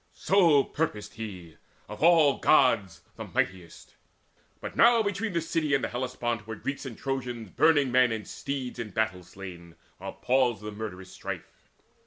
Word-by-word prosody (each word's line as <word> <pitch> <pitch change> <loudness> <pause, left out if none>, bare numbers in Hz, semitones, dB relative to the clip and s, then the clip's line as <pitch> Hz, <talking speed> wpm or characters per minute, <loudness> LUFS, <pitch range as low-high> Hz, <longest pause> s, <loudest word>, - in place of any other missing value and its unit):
So 170 -8 +4
purposed 105 -10 -3
he, 95 -7 -8 0.3
of 105 - -9
all 160 -4 +5
Gods 115 - +3 0.2
mightiest. 90 -3 -4 0.7
But - - -7
now 235 -1 +6
between 205 0 -2
the 170 - +1
city 155 -3 0
and 135 - 0
Hellespont 120 -3 -3
Were 110 - -5
Greeks 135 +5 -5
and 115 - -8
Trojans 125 -6 -4
burning 145 -5 +3
men 125 -1 +4
and 110 -2 -4
steeds 135 -3 -5
In 115 -2 -4
battle 100 -3 -1
slain, 90 -2 -11 0.2
while - - -6
paused 125 -4 +1
the 105 - -5
murderous 100 -3 -7
strife. - - -7
120 Hz, 150 wpm, -28 LUFS, 105-145 Hz, 0.7 s, now